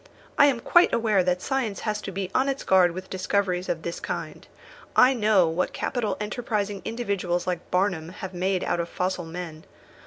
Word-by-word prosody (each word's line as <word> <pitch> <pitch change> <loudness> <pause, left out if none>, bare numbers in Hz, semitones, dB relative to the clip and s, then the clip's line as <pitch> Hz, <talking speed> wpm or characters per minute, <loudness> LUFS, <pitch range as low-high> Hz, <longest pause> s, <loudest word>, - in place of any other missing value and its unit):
I 285 - +7
am 260 -4 +1
quite 345 +7 +5
aware 215 -5 +2
that 180 0 0
science 260 -7 -1
has 210 -1 -2
to 195 - -6
be 190 0 -4
on 265 +2 +2
its 275 0 -3
guard 185 -2 +4
with 185 +1 -7
discoveries 185 -1 -1
of 165 -1 -2
this 170 - -4
kind. - - -6 0.5
I 255 +2 +6
know 210 -7 +3
what 165 +3 -1
capital 240 -4 -2
enterprising 210 -2 -2
individuals 200 -7 -2
like 180 -2 -3
Barnum 180 -4 0
have 190 0 -8
made 185 +1 0
out - - -1
of 170 0 -2
fossil 185 -1 -2
men. 160 -1 -7
190 Hz, 185 wpm, -25 LUFS, 180-215 Hz, 0.5 s, I